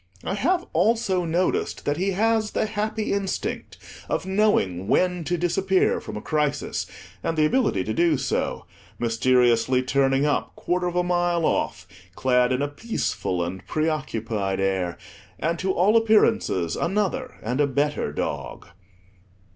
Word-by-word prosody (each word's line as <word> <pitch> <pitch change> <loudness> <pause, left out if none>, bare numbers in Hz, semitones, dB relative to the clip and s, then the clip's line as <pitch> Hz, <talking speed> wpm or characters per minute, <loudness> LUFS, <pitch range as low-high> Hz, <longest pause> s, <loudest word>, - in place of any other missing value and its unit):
I - - -2
have 350 - +1
also 205 -6 +2
noticed 170 +3 -1
that 145 +1 0
he 190 +2 0
has 220 +2 +1
the - - +1
happy 215 0 -2
instinct 200 -1 -3 0.3
of - - -1
knowing 190 - +1
when 180 +7 +2
to 175 +2 0
disappear 185 +3 +1
from - - -7
a 105 - -7
crisis, 150 -2 -1 0.4
and 165 - -1
the 155 - +4
ability 155 - +1
to 110 - -3
do 165 0 +3
so; 130 - -2 0.3
mysteriously 120 +1 +2
turning 135 +1 +2
up, 145 - -1
quarter 180 0 -1
of 175 - -3
a 180 - +2
mile 175 -1 +1
off, 95 -10 -1 0.3
clad 125 -1 +2
in 130 +2 +1
a - - 0
peaceful 145 - -2
and 90 +2 -7
pre 155 +1 0
occupied 110 -9 -2
air, 95 -3 -1 0.4
and 165 +1 -1
to 190 +1 0
all 195 +5 +3
appearances 220 - +3
another 210 +8 -1
and 125 +6 0
a 145 - +3
better 140 - -1
dog. 75 - -5
160 Hz, 150 wpm, -24 LUFS, 125-195 Hz, 0.4 s, the